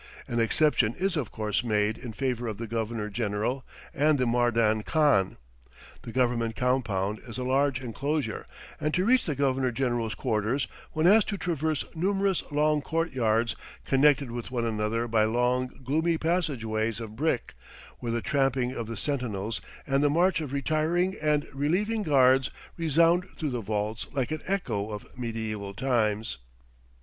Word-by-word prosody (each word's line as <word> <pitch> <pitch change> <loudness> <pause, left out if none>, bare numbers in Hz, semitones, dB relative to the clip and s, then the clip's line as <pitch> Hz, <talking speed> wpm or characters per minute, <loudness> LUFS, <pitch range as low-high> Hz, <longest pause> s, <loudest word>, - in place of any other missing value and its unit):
An 120 - -1
exception 115 -1 +3
is 190 0 0
of 140 -9 -2
course 105 +1 -1
made 105 -2 +1
in 120 0 -7
favor 125 0 -2
of 110 -2 -4
the 115 - -4
Governor 110 -1 -2
General 110 +4 -2 0.3
and 150 +1 +3
Mardan 115 -2 +2
Khan. 145 - +2 0.6
The 115 - -8
Government 120 -2 +1
compound 110 -5 0
is 115 - -7
a 130 - -2
large 135 0 +2
enclosure, 135 0 -3 0.3
and 150 0 0
to 185 - +2
reach 255 +3 +4
the 150 - -1
Governor 135 -2 +1
General's 120 -3 -1
quarters 115 +2 0 0.3
one 155 +1 +1
has 210 +4 +7
to 205 - -3
traverse 160 -4 -1
numerous 195 +2 +1
long 150 0 +2
court 165 +2 -1
yards 115 -2 +1 0.3
connected 140 -1 +3
with 120 -1 -5
one 120 -2 -1
another 110 +1 -1
by 110 -2 +3
long, 125 +3 +1 0.2
gloomy 160 +5 +1
passage 160 -8 0
ways 110 0 -1
of 110 -2 -7
brick, 145 0 -1 0.5
where 120 - -3
the 120 0 -1
tramping 135 -3 +1
of 115 -4 -4
the 115 -1 -5
sentinels 115 -5 -2 0.2
and 135 0 +1
the 145 - +4
march 175 +3 +3
of 145 -4 -5
retiring 155 +6 +1
and 150 -1 +2
relieving 185 +11 0
guards 130 - +4 0.3
resound 165 +2 +3
through 150 -3 -2
the 120 -2 -2
vaults 105 +1 -2
like 135 0 -1
an 155 -1 -2
echo 145 - -1
of 105 -1 -8
mediaeval 110 -4 -4
times. 110 - 0
125 Hz, 160 wpm, -28 LUFS, 110-150 Hz, 0.6 s, has